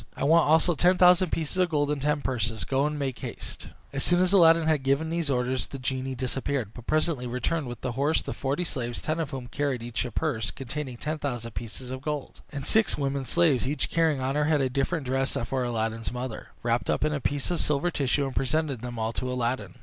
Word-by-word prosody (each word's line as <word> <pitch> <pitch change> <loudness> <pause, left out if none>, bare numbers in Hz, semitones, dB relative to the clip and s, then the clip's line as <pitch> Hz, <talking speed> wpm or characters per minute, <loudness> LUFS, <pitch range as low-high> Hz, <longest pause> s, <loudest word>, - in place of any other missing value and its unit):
I - - -3
want 160 +3 +5
also 160 +3 +5
ten 180 +3 +3
thousand 180 -1 +6
pieces 160 +2 -2
of 180 -1 +3
gold 145 -2 +1
in 150 - -1
ten 150 +2 +1
purses; 110 -5 -1
go, 135 +2 +1
and 150 0 -3
make 135 -3 -3
haste," - - -6 0.3
As 135 - -1
soon 175 0 +3
as 185 +1 +3
Aladdin 165 -3 +6
had 155 -3 +2
given 140 +4 +1
these 165 -3 -1
orders, 125 0 0
the 140 - -7
genie 130 0 -2
disappeared, 130 -2 -2
but 120 - -11
presently 155 -5 +1
returned 130 +5 -1
with 120 -1 -7
the 130 - -2
horse, 140 +6 +1
the - - -4
forty 140 +5 -1
slaves, 120 -7 -3
ten 155 +1 -2
of 160 -4 -1
whom 130 -2 -5
carried 135 -1 -2
each 120 -1 -2
a 125 - -4
purse 110 - -1
containing 130 +4 -5
ten 155 +5 -3
thousand 120 -5 -3
pieces 120 +2 -6
of 130 0 -5
gold, 150 -1 -4
and 140 -2 -5
six 220 -1 +3
women 140 -1 -1
slaves, 155 -5 +3
each 145 +3 -1
carrying 160 -4 +2
on 130 +1 -1
her 150 +1 +1
head 155 -1 +3
a 130 -2 +1
different 140 +3 -1
dress 135 +1 0
for 130 +2 -1
Aladdin's 115 -2 -2
mother, 125 -2 -5 0.2
wrapped 120 0 0
up - - +2
in 155 - +1
a 145 - -2
piece 145 +5 -1
of 175 - 0
silver 150 +4 +1
tissue, 140 -1 +1
and 135 - -5
presented 140 -2 0
them 120 -1 -6
all 110 +1 -1
to 125 +2 -3
Aladdin. 125 +1 -2
135 Hz, 235 wpm, -27 LUFS, 125-155 Hz, 0.3 s, thousand